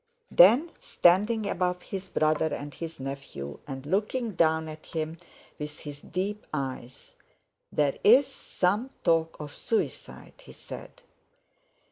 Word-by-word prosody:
Then 245 - +7
standing 210 +5 +3
above 180 -1 -1
his 190 -1 -6
brother 155 0 +2
and 145 0 -5
his 165 +2 -7
nephew, 135 - -6
and 135 -1 -6
looking 215 - 0
down 160 -3 +2
at 155 0 -9
him 160 0 -4 0.4
with 150 0 -6
his 145 -1 -8
deep 205 +3 -3
eyes: 130 -3 -5 0.6
"There's—some—talk—of—suicide," 180 - +1
he - - -13
said. - - -11
165 Hz, 100 wpm, -28 LUFS, 150-200 Hz, 0.6 s, Then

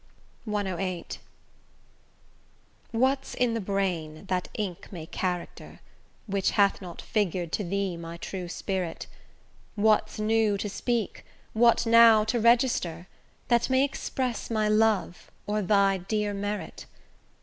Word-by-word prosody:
CVIII 190 -4 -3 1.7
What's 265 +4 0
in 245 -2 +1
the 230 - -2
brain, 185 -5 -2
that 180 -1 -1
ink 195 -6 -5
may 170 -5 -7
character, 180 +1 -4 0.5
Which 195 -2 0
hath 200 -1 +3
not 175 -3 -8
figur'd 180 -6 -1
to 210 - -1
thee 195 0 -2
my 170 0 -7
true 180 +1 -6
spirit? 180 -1 -3 0.7
What's 215 0 +2
new 215 -1 +2
to 205 +1 -3
speak, 235 +1 -2 0.3
what 235 +1 +4
now 230 -1 +7
to 225 +3 0
register, 230 -8 +2 0.4
That 235 0 +3
may 260 +1 +4
express 255 -3 -3
my 215 -2 +1
love, 215 -5 +1 0.2
or 210 +1 -1
thy 195 0 +3
dear 205 +2 -2
merit? 205 +1 -5
205 Hz, 120 wpm, -27 LUFS, 185-225 Hz, 1.7 s, now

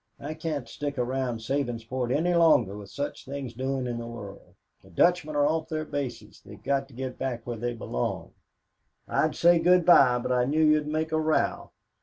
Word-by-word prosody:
I 150 +2 -5
can't 155 -4 -4
stick 145 -1 -5
around 125 -2 -2
Sabinsport 120 -1 -2
any 165 +6 +1
longer 155 - +4
with 100 -1 -9
such 145 0 -5
things 135 -3 -6
doin' 130 +1 -2
in 120 -1 -3
the 115 - -6
world. 100 -4 -10 0.3
The 95 - -19
Dutchmen 155 - +2
are 145 0 +3
off 160 +1 0
their 155 -1 -3
bases 140 -5 -6
they've - - -13
got 135 -1 0
to 135 - -17
get 130 0 -5
back 120 -3 -3
where 120 - -4
they 120 +2 -3
belong. 60 - -3 0.8
"I'd - - +1
said 170 -1 +4
good 180 -1 +5
by 130 -8 +6
but 125 - -3
I 125 -1 +2
knew 155 +4 +2
you'd 150 -1 +3
make 155 +1 -2
a 155 - +1
row. 155 0 0
135 Hz, 195 wpm, -27 LUFS, 120-155 Hz, 0.8 s, by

